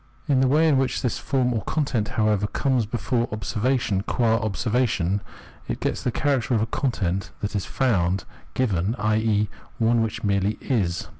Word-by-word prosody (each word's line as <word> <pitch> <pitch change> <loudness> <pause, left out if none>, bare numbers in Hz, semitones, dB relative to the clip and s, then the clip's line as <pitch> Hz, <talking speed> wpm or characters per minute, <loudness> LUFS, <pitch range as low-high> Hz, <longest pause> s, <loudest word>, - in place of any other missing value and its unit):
In 140 -3 +3
the 130 - +4
way 155 +5 +4
in 140 -4 +4
which 135 - 0
this 125 - -1
form 130 -3 +1
or 110 - -1
content, 130 -8 -1
however, 105 -2 +2
comes 125 -2 0
before 115 +2 -1
observation 110 0 0
qua 115 +1 +1
observation, 110 -3 0 0.5
it - - -3
gets - - -1
the 125 - 0
character 130 -2 +1
of 110 - +2
a - - +2
content 100 -6 -1
that 105 0 -3
is 100 - -1
found, 95 -8 +1 0.3
given, 105 -4 +1
i.e. 110 -1 +1 0.3
one 115 -1 +3
which 110 0 -3
merely 100 +1 +1
is. 90 -9 -1
110 Hz, 165 wpm, -24 LUFS, 100-125 Hz, 0.5 s, the